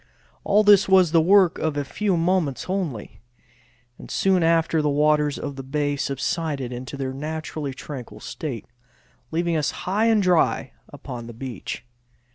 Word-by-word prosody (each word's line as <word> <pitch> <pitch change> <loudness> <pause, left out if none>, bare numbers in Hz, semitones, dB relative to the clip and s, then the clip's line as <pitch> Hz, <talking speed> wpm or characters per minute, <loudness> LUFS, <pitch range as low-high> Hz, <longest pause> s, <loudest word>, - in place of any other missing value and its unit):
All 205 +1 +3
this 205 -2 +6
was 185 -4 +5
the 165 -1 +5
work 190 +1 +4
of 155 -2 -1
a 145 - -1
few 195 +4 -1
moments 165 -5 0
only, 175 - -4 0.8
and - - -11
soon 190 -2 +2
after 165 -1 +2
the 150 - +1
waters 150 0 +2
of 140 -2 -6
the - - -4
bay 145 +1 -1
subsided 140 -1 -2
into 125 +3 -7
their 130 -1 -3
naturally 150 -1 -5
tranquil 135 -3 -8
state, 120 0 -6 0.6
leaving 170 +1 0
us 150 -2 +1 0.2
high 205 +5 +1
and 220 -3 +3
dry 180 -3 +2 0.2
upon 120 -2 -8
the 120 - -8
beach. 120 -1 -6
155 Hz, 155 wpm, -23 LUFS, 135-180 Hz, 0.8 s, this